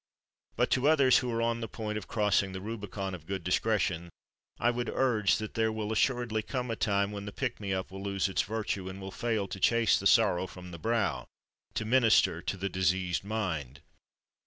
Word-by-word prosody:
But - - +1
to 130 +2 +3
others 140 -5 +5
who 125 -1 -3
are 115 0 0
on 115 0 0
the 115 - -3
point 110 -2 -5
of 105 - -5
crossing 105 -3 +1
the 95 - -4
Rubicon 100 -2 -5
of 80 -3 -9
good 95 -2 -3
discretion 90 -2 0 0.5
I 120 - +3
would 120 0 -3
urge 115 -6 +2
that 110 0 -5
there 110 0 +1
will 110 -1 -3
assuredly 120 -1 +1
come 125 +1 -3
a - - -1
time 100 -2 +1
when 100 -1 -6
the - - -4
pick 120 +2 -3
me 100 -2 -4
up 95 -1 -2
will 95 0 -7
lose 100 -1 0
its 95 - +1
virtue, 105 -4 -3
and 95 +1 -8
will 95 0 -7
fail 110 -2 -1
to 95 - -6
chase 115 +3 +4
the 100 - +2
sorrow 95 -5 +4
from 90 0 -11
the 85 - -8
brow, 110 - 0 0.5
to 110 - -1
minister 115 -2 +4
to 100 - -3
the 95 +1 -2
diseased 90 -1 0
mind. 85 - -3
105 Hz, 205 wpm, -30 LUFS, 95-115 Hz, 0.5 s, others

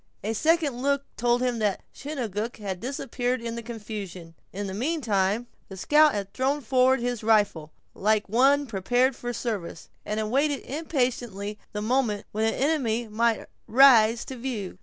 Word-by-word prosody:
A 215 +2 -1
second 305 -1 +1
look 280 0 +1
told 240 +1 +1
him 245 -2 0
that 210 -3 0
Chingachgook 235 -6 -4
had 195 -4 -5
disappeared 255 0 -2
in 230 0 -5
the 235 - -5
confusion. 205 -7 -7 0.2
In 200 +2 -4
the 190 - -5
meantime, 225 - 0 0.2
the 190 - -9
scout 300 +8 +4
had 200 -1 -4
thrown 275 +3 0
forward 255 +1 +3
his 245 -2 -2
rifle, 205 -8 +2 0.2
like 215 +1 +1
one 270 +7 +3
prepared 245 +4 +1
for 240 0 -4
service, 215 -8 -5
and 210 +1 -3
awaited 275 +6 +1
impatiently 245 - -2
the 210 0 -4
moment 220 -3 0
when 215 +1 0
an - - -5
enemy 250 -6 0
might 225 +1 +1 0.2
rise 235 -2 +6
to 265 - -7
view. 225 -8 -5
235 Hz, 160 wpm, -26 LUFS, 210-265 Hz, 0.2 s, rise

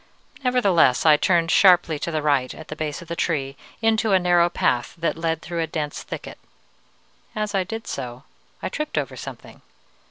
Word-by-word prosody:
Nevertheless, 200 - +3
I 155 -1 +8
turned 165 +1 +2
sharply 175 -5 +5
to - - -3
the 155 -2 -2
right, 140 -4 +1
at 160 - -12
the 155 - -5
base 155 +1 -4
of - - -17
the 170 - -4
tree, 140 -6 -1 0.3
into 220 -1 +2
a - - +7
narrow 175 -1 +3
path 120 -7 0
that 165 0 -1
led 165 0 -2
through 170 -1 -3
a 165 - -1
dense 150 -2 -4
thicket. - - -8 1.0
As 215 -1 -2
I 195 -1 +2
did 225 +3 -6
so 125 -1 -6 0.4
I - - -1
tripped 305 0 -4
over - - -2
something. - - -10
165 Hz, 185 wpm, -23 LUFS, 150-190 Hz, 1.0 s, I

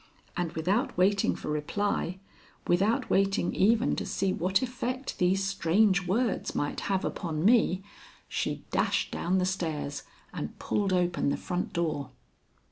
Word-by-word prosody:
And 175 -3 -2
without 200 - 0
waiting 195 +2 +3
for - - -6
reply, 180 +4 -1 0.5
without 200 +6 +2
waiting 195 -2 +2
even 230 +5 +3
to - - -2
see 190 -1 -1
what 190 +7 +1
effect 255 +1 -4
these 185 +2 +2
strange 195 0 +2
words 225 +4 0
might 145 - -1
have 190 -1 +1
upon 165 -2 -2
me, 210 -4 +4 0.4
she - - -3
dashed - - +1
down 180 +2 0
the 180 - +2
stairs 160 -6 -2 0.3
and - - -5
pulled 200 -2 0
open 180 -5 +1
the - - 0
front 180 -1 -3
door. 155 -6 -1
190 Hz, 140 wpm, -29 LUFS, 170-205 Hz, 0.5 s, me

